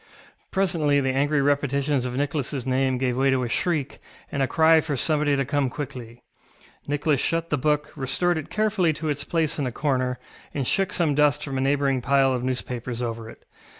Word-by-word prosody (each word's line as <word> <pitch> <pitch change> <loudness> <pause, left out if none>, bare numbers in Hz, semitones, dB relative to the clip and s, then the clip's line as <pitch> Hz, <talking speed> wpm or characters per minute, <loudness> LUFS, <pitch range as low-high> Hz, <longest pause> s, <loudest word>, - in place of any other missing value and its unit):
Presently 165 -7 +2
the 135 -1 0
angry 140 +1 +2
repetitions 140 -1 +1
of 125 - -3
NicholasŌĆÖ 140 -1 -2
name 130 0 +1
gave 125 -1 0
way 135 +2 +2
to 130 -1 +2
a - - -1
shriek, 155 +1 -1 0.3
and 140 - -2
a 135 - +2
cry 160 +3 +5
for 145 -3 -3
somebody 150 +1 +1
to 135 -1 0
come 145 -1 0
quickly. 120 -4 -7 0.6
Nicholas 145 -1 +1
shut 165 0 -1
the - - +3
book, 150 +1 0
restored 160 +6 0
it 150 - -8
carefully 210 -6 +1
to 155 +1 -4
its 145 -1 -2
place 160 -1 -1
in 140 - 0
a - - -3
corner, 130 -2 -1 0.4
and 140 -3 -1
shook 195 +8 +1
some 165 -5 +1
dust 150 0 +2
from 135 -2 -3
a - - 0
neighbouring 135 -1 +1
pile 135 0 +3
of 125 -1 -2
newspapers 125 -2 -3
over 115 -1 -4
it. - - -15
140 Hz, 195 wpm, -24 LUFS, 130-150 Hz, 0.6 s, cry